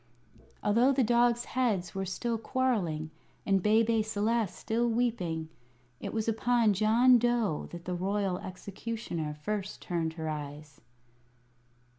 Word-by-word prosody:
Although 235 +6 +4
the 265 -1 +3
dog's 240 +1 +3
heads 220 -9 0
were 195 0 -3
still 230 +4 -2
quarrelling, 205 - -1 0.3
and 195 -1 +3
Bebe 220 +2 +3
Celeste 215 -1 0
still 235 +2 0
weeping, 205 -9 -1 0.5
it - - -5
was 220 -1 -2
upon 225 -1 +3
John 230 +5 +5
Dough 235 -8 0
that 170 0 -9
the 180 - -2
Royal 190 0 -1
Executioner 185 -4 -5
first 195 +6 -4
turned 165 -2 -2
her 160 -1 -5
eyes. 150 -1 -6
210 Hz, 125 wpm, -30 LUFS, 175-235 Hz, 0.5 s, John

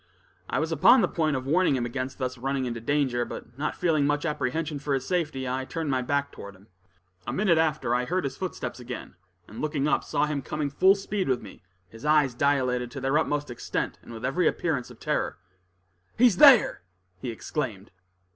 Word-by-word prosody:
I - - -1
was 160 +1 -1
upon 230 - +6
the - - +3
point 155 -3 0
of 130 0 -3
warning 160 +1 +3
him 120 -2 -1
against 130 +2 -4
thus 130 -1 -3
running 135 +1 -2
into 115 -2 -4
danger, 130 -2 +1
but 120 0 -9
not 150 - -1
feeling 155 -5 +2
much 145 +2 0
apprehension 150 0 -2
for 140 0 -1
his 135 -1 -3
safety, 150 -7 -1
I 130 +1 -2
turned 155 +2 -3
my 130 -1 +1
back 140 +2 -1
toward 100 0 -10
him. 95 +3 -21 0.6
A - - -1
minute 185 -5 +2
after, 155 -7 +1
I 125 +1 +1
heard 180 +6 -1
his 140 - -3
footsteps 185 -7 -5
again, 125 0 -7 0.3
and, 110 - -8
looking 150 -2 0
up, - - +2
saw 145 - 0
him 150 -2 -2
coming 150 +1 -3
with 140 - -23
full 190 +1 +7
speed 195 -1 -3
toward 130 -3 0
me, 100 - -12 0.3
his 115 +4 -14
eyes 150 -3 +3
dilated 125 -2 +1
to 135 - -7
their 135 +3 +2
utmost 145 -3 -1
extent, 120 - -3
and - - -13
with 115 +1 -6
every 155 +6 +1
appearance 145 -7 -1
of - - -14
terror. - - -1 0.8
"He's 235 -6 +5
there!" 270 -3 +7 0.4
he 125 - -5
exclaimed. 110 -3 -4
140 Hz, 205 wpm, -26 LUFS, 125-155 Hz, 0.8 s, full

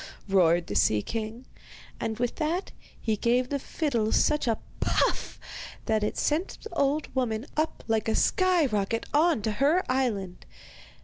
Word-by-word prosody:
roared 175 -3 +3
the - - -5
sea 105 0 +3
king; 225 +2 -5 0.5
and 220 -1 -2
with 245 0 -2
that 330 +4 -1 0.3
he 220 - 0
gave 245 +4 +1
the 280 - -1
fiddle 240 -7 -1
such 300 -3 +2
a 225 - +2 0.2
'puff' - - 0 0.5
that 215 -1 +1
it 210 - -2
sent 315 +5 0
the 445 - -8
old 290 -1 0
woman 240 -3 -1
up 310 +1 -1
like 225 -1 0
a 220 - +1
sky 365 -4 +3
rocket 215 -1 -1
on 305 -6 +3
to 220 - 0
her 290 - +2
island. 210 -9 -2
235 Hz, 160 wpm, -27 LUFS, 215-300 Hz, 0.5 s, roared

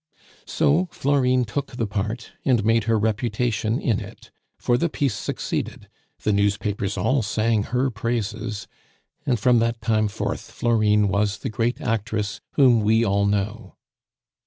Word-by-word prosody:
So 160 +4 +2
Florine 130 -3 +2
took 130 +5 -4
the 115 - -1
part, 105 +3 -3
and 120 -6 +2
made 115 -1 +3
her 115 0 +2
reputation 110 +2 0
in 115 -9 +1
it; - - -11 0.3
for 120 - +1
the 165 +7 +1
piece 140 -5 0
succeeded, - - -4 0.4
the 105 - +2
newspapers 100 0 0
all 135 0 +2
sang 110 +1 +1
her 125 +2 0
praises, 110 -1 -3 0.6
and 125 -4 +2
from 120 +3 +4
that 115 0 0
time 110 -1 +1
forth 100 - -4
Florine 105 -3 +2
was 100 +1 0
the - - -4
great 115 +3 -1
actress 110 -2 -2
whom 125 -5 +5
we 110 +2 +3
all 100 0 +2
know. 105 +2 -2
115 Hz, 145 wpm, -23 LUFS, 105-120 Hz, 0.6 s, whom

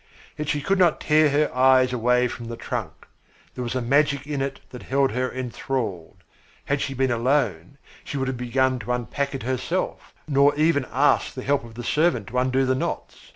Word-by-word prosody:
Yet 150 -1 -4
she 150 - 0
could 195 +6 +1
not 175 -4 +4
tear 155 0 +4
her 145 -1 +1
eyes 130 0 +4
away 125 +1 +2
from 120 -1 -7
the 115 0 -6
trunk. - - -5 0.5
There 125 - -5
was 120 +1 -4
a 130 - -1
magic 140 +2 +2
in 145 -2 -3
it 135 0 -3
that 125 - -9
held 135 +1 +1
her 125 +3 -1
enthralled. 125 -7 -4 0.4
Had 140 0 0
she 135 - -3
been 130 0 +1
alone 120 - 0 0.3
she 140 - -5
would 135 -1 -1
have 130 - -2
begun 130 +1 0
to 125 +1 -3
unpack 135 +4 -2
it 135 - -5
herself, 130 +1 -3
nor 140 0 +4
even 155 0 +3
have - - -19
asked 140 +4 +2
the 130 - -5
help 140 -2 +1
of 115 -1 -12
a 120 - -5
servant 150 - +1
to 125 - 0
undo 130 +1 +1
the 130 - +2
knots. 130 - -4
130 Hz, 205 wpm, -24 LUFS, 125-140 Hz, 0.5 s, not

